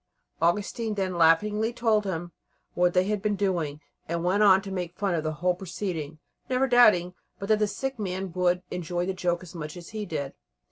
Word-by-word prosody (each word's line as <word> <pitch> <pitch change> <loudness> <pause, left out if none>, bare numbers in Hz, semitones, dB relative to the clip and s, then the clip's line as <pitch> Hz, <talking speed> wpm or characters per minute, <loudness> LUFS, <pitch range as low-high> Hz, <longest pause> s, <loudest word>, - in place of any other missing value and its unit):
Augustine 210 +6 0
then 190 -2 -1
laughingly 210 +7 +3
told 225 -3 +1
him 175 -2 -4 0.4
what 180 0 +2
they 180 - +5
had 205 +1 -1
been 210 0 0
doing, 175 -7 -1 0.3
and 170 +1 -2
went 190 +4 +2
on 195 -2 +7
to 195 0 -8
make 180 -2 -4
fun 200 -2 0
of 160 -2 -1
the 155 0 -2
whole 180 +4 +1
proceeding, 175 -4 -5 0.3
never 260 +1 +2
doubting 215 -8 +5 0.2
but 200 - -6
that 215 -1 +4
the 210 - +2
sick 270 +4 -4
man 190 -2 -3
would 180 0 +1
enjoy 175 0 -2
the 190 - -1
joke 180 -1 -1
as 180 - -11
much 155 -1 -6
as 175 - -10
he 215 -1 -5
did. 140 -5 -4
185 Hz, 200 wpm, -27 LUFS, 175-210 Hz, 0.4 s, on